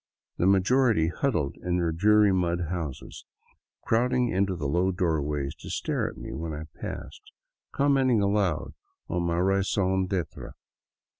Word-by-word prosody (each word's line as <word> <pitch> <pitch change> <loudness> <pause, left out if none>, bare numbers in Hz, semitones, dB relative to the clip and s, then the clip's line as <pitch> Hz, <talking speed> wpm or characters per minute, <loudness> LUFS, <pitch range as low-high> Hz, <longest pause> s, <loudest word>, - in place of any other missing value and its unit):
The 90 - +2
majority 100 -2 +3
huddled 85 - -1
in 90 0 -1
their 85 -2 +1
dreary 105 +4 +4
mud 90 -2 0
houses, 80 -7 -5 0.6
crowding 125 +2 +2
into 95 0 0
the 85 - -5
low 90 +6 +1
doorways 75 -6 -1
to - - -9
stare - - -1
after - - -12
me - - -6
when 80 -1 -4
I 75 - -6 0.2
passed, - - -6 0.5
com 140 0 +2
menting 130 -4 +3
aloud 100 -5 0 0.4
on 90 - -1
my 85 -1 0
raison 95 0 +1
d'etre. 90 -4 -4
95 Hz, 145 wpm, -27 LUFS, 85-105 Hz, 0.6 s, dreary